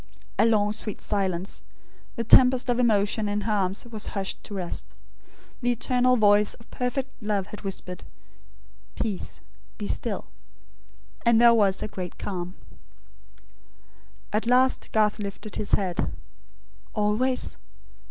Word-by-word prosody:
A 225 - +6
long 210 -2 +3
sweet 215 -1 -4
silence. 190 -2 -2 0.5
The 230 - -2
tempest 250 +2 +6
of 245 - 0
emotion 210 -2 +2
in 205 0 -1
her 215 +2 -1
arms 195 0 0
was 220 -3 -7
hushed 195 -1 -3
to 205 - -7
rest. 180 -3 -4 0.7
The 245 0 +2
eternal 250 +1 +2
voice 205 -1 +4
of 230 - -20
perfect 255 +2 -2
love 210 -3 0
had 210 - -9
whispered: 185 -2 -5 0.9
"Peace, 210 -5 -3 0.4
be - - -4
still"; - - -1 1.0
and 235 -1 +5
there 235 0 +8
was 200 -4 +3
a - - -2
great 185 -4 -6
calm. 180 -2 -4 1.8
At 215 +2 0
last 255 +1 +3
Garth 215 -1 +2
lifted 205 +1 -6
his 210 - -3
head. 185 -3 +1 0.8
"Always? 220 +5 0
210 Hz, 130 wpm, -26 LUFS, 200-235 Hz, 1.8 s, there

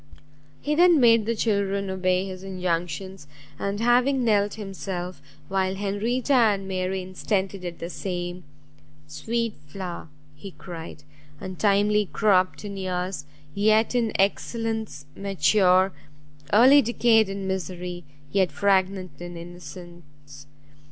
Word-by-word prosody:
He 295 - -1
then 345 0 +5
made 230 -3 +5
the 230 - +1
children 200 -2 0
obey 185 0 +1
his 185 -1 -7
injunctions, 180 -1 -3 0.3
and 200 +1 -2
having 250 +3 +3
knelt 205 -3 +2
himself, 190 -3 -6 0.3
while 190 +1 0
Henrietta 215 +7 -1
and 210 -6 +3
Mary 185 0 -2
instantly 190 +1 -2
did 175 -2 -6
the 170 - -5
same, 180 -1 -4 0.6
"Sweet 225 +10 -2
flower!" 175 +1 -6 0.3
he 185 +5 -10
cried, 165 -4 -9 0.4
"untimely 205 +2 +1
cropt 190 0 +2
in 200 -1 -6
years, 180 -4 -3 0.3
yet 215 +3 +3
in 235 -3 +1
excellence 220 -4 -1
mature! 190 0 +3 0.6
early 260 +7 +7
decayed 225 -3 +3
in 195 0 -4
misery, 180 -1 -4 0.3
yet 190 -3 +2
fragrant 190 -2 +1
in 175 0 -7
innocence! 165 -4 -12
195 Hz, 115 wpm, -25 LUFS, 180-215 Hz, 0.6 s, early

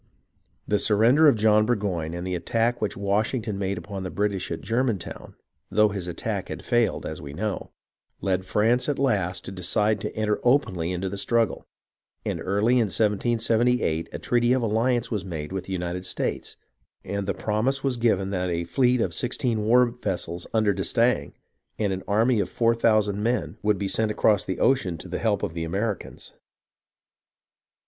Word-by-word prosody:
The 105 - +2
surrender 115 +9 +5
of 140 - +6
John 110 0 +4
Burgoyne 95 -8 -1
and 85 +1 -5
the 90 - -2
attack 115 +7 0
which 105 - -2
Washington 105 +2 -1
made 100 0 -1
upon 100 -2 -6
the 95 - -4
British 100 -1 -1
at 85 - -4
Germantown 115 -5 -2 0.3
(though 105 +1 +4
his 95 -3 -5
attack 85 - -3
had - - -7
failed, 120 -2 +1
as 80 - -5
we 70 0 -8
know) 105 +6 -3 0.5
led 95 -1 0
France 115 +8 +2
at 145 - 0
last 100 -10 0
to - - -6
decide 100 +3 +1
to - - -5
enter 110 -1 0
openly 95 - +2
into 90 +1 -2
the 100 +1 -5
struggle; 115 0 0 0.6
and - - -2
early 105 +6 +2
in 115 - +3
1778, 115 -4 +1
a - - -5
treaty 120 0 +2
of 130 -2 +1
alliance 115 +3 +1
was 105 -5 -1
made 80 -4 -6
with 95 -1 -4
the 95 - -5
United 90 0 -3
States, - - -3 0.5
and 100 -1 -3
the 100 - -1
promise 120 +6 -1
was 135 -3 0
given 100 -5 +1
that 90 -2 -1
a 85 0 -1
fleet 125 +6 +2
of - - -1
sixteen 120 -3 -1
war 125 +3 +5
vessels 95 -8 -4
under 110 -2 +2
d'Estaing, 115 +5 +1 0.4
and 100 -3 0
an 95 - -4
army 110 +3 +3
of - - -1
four 115 -1 +2
thousand 110 -3 +2
men, 120 +3 -1
would 105 -1 +2
be 100 - -2
sent 110 +2 +1
across 105 -1 +2
the 95 - -4
ocean 95 -11 +2
to 85 - -8
the 90 - -4
help 105 -4 0
of - - -2
the 85 -1 -3
Americans. 100 +4 -4
105 Hz, 180 wpm, -25 LUFS, 95-115 Hz, 0.6 s, of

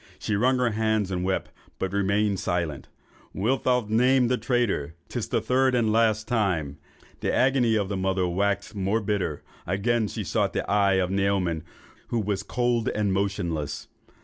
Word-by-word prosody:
She 105 - -2
wrung 130 +5 +3
her 125 -2 +1
hands 110 -2 0
and 90 -1 -1
wept, 95 0 -1 0.3
but 95 0 -3
remained 100 0 +1
silent. 85 -6 -2 0.5
'Wilt 125 +7 0
thou 125 -2 +2
name 125 +3 +3
the 125 - +3
traitor? 110 - 0
'Tis - - -3
the - - 0
third 130 0 +2
and 115 -3 +2
last 110 -1 +2
time.' 90 - 0 0.4
The - - -1
agony 125 -3 +3
of 100 -3 0
the 100 0 -3
mother 95 -1 0
waxed 100 +3 -1
more 100 +2 0
bitter; 95 -8 -2 0.2
again 105 +5 +1
she 90 - -4
sought - - 0
the - - -2
eye 100 -1 +3
of 95 -1 +1
Naoman, 95 -4 0 0.5
but 120 - -1
it 110 - -1
was 100 -2 -1
cold 120 +2 0
and 105 -2 +1
motionless. 90 -7 -2
100 Hz, 175 wpm, -26 LUFS, 95-115 Hz, 0.5 s, wrung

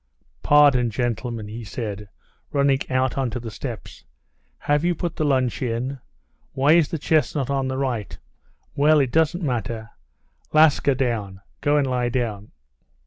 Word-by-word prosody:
"Pardon, 140 -5 +5
gentlemen!" 115 -1 -3
he 115 +3 -7
said, 105 -2 -6 0.4
running 140 -1 +2
out 130 +1 0
onto 125 -2 -2
the 115 -1 -7
steps. 120 +1 -8 0.5
"Have 145 +1 0
you 175 0 +1
put 170 0 -4
the - - -1
lunch 130 -4 +1
in? 125 +2 -2 0.5
Why 140 +3 +3
is 165 -3 +4
the 165 - -3
chestnut 150 -3 0
on 135 -1 0
the 130 0 -3
right? 125 -6 -3 0.6
Well, 150 +2 +4
it 135 -3 +1
doesn't 160 +3 +1
matter. 115 -5 -3 0.6
Laska, 155 -3 +4
down; 110 -7 -2 0.2
go 145 0 +2
and 145 - +2
lie 125 -2 0
down!" 115 -5 -3
130 Hz, 145 wpm, -23 LUFS, 115-145 Hz, 0.6 s, Pardon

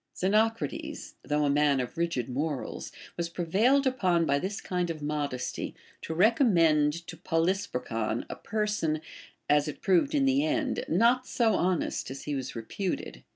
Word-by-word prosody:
Xenocrates, 220 +4 0
though 150 0 0
a - - +2
man 145 -1 +3
of 125 -2 -4
rigid 170 -8 -1
morals, 140 +2 -3 0.3
was 170 -1 -2
prevailed 210 +12 +2
upon 185 -10 +2
by 140 -2 +2
this 195 +6 -3
kind 180 -1 -2
of 155 -2 -5
modesty 145 -4 -3 0.3
to 160 - -5
recommend 170 - +3
to 175 - -8
Polysperchon 165 - -1
a - - -6
person, 210 -8 -1 0.5
as 150 +1 +3
it 150 - -5
proved 195 - +3
in 280 -2 +3
the 270 +1 +3
end, 310 -4 0
not 240 +8 +3
so 230 -3 +2
honest 180 -1 0
as 135 +1 -7
he 150 - -3
Avas 130 -2 -4
reputed. 175 - -4
170 Hz, 155 wpm, -28 LUFS, 150-215 Hz, 0.5 s, man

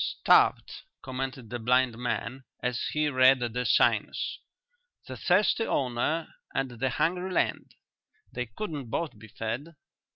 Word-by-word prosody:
"Starved," - - +4 0.2
commented 130 -3 -5
the 120 - -3
blind 125 +1 +2
man, 125 +2 -3 0.2
as 125 -1 -1
he 150 0 +1
read 130 -1 +5
the 125 0 -2
signs. - - +2 0.7
"The - - -7
thirsty 210 +4 +2
owner 135 +5 -1 0.2
and 135 -2 -1
the 125 +2 -1
hungry 180 +8 0
land: - - -1 0.6
they 125 -1 -3
couldn't 140 - -6
both 150 -3 -3
be 110 - -12
fed." 120 +10 -5
130 Hz, 130 wpm, -28 LUFS, 120-150 Hz, 0.7 s, read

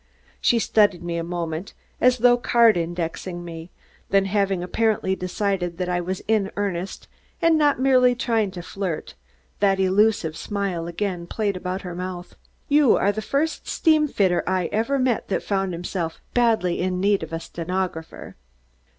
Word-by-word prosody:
She 240 - +3
studied 205 -5 +2
me 170 -1 -3
a 165 - -2
moment, 170 +1 -4 0.3
as 250 0 +5
though 245 0 +5
card 235 -2 +4
indexing 175 +1 -3
me, 165 0 -8 0.4
then 195 0 +3
having 195 -2 0
apparently 200 0 0
decided 180 -2 -2
that 180 0 -2
I 175 0 0
was 185 +2 -4
in 210 -3 +2
earnest 195 -2 -3 0.3
and 330 -1 +4
not 295 -4 +3
merely 255 -2 +4
trying 225 -4 0
to 175 - -6
flirt, 185 -4 -4 0.5
that 195 -1 +3
elusive 190 -3 +2
smile 195 -5 -3
again 175 0 -3
played 205 -1 -1
about 185 +1 -4
her 180 -2 -6
mouth. 180 0 -6 0.3
"You 290 -3 +5
are 200 - +2
the 215 +2 -4
first 285 +8 -1
steamfitter 300 - +2
I 185 -2 0
ever 230 +6 0
met 255 -4 0
that 195 - -1
found 195 -2 -1
himself 170 -1 -4
badly 225 -8 +2
in 180 0 -1
need 200 +1 +2
of 160 - -7
a 165 - -3
stenographer." 170 -1 -5
190 Hz, 160 wpm, -23 LUFS, 175-220 Hz, 0.5 s, as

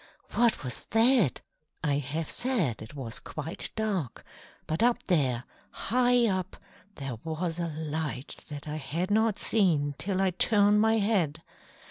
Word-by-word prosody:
What 235 -8 +2
was 125 -4 -7
that? 225 - +3 0.4
I 145 -2 +1
have 150 +3 -2
said 225 - 0
it 110 +7 -10
was 125 -5 -3
quite 160 +5 -1
dark, 200 - -2 0.4
but 160 +5 -2
up 240 +1 +3
there, 130 -9 +1 0.3
high 245 +1 +2
up, 185 -3 -2 0.4
there 135 -4 -5
was 165 +1 -3
a 170 - -1
light 155 -3 -3
that 145 0 -7
I 150 +1 -3
had 165 +6 -2
not 220 0 +2
seen 160 -10 +2
till 190 0 0
I 190 -1 +2
turned 205 +2 +4
my 220 0 +4
head. 185 -8 0
170 Hz, 145 wpm, -28 LUFS, 145-215 Hz, 0.4 s, turned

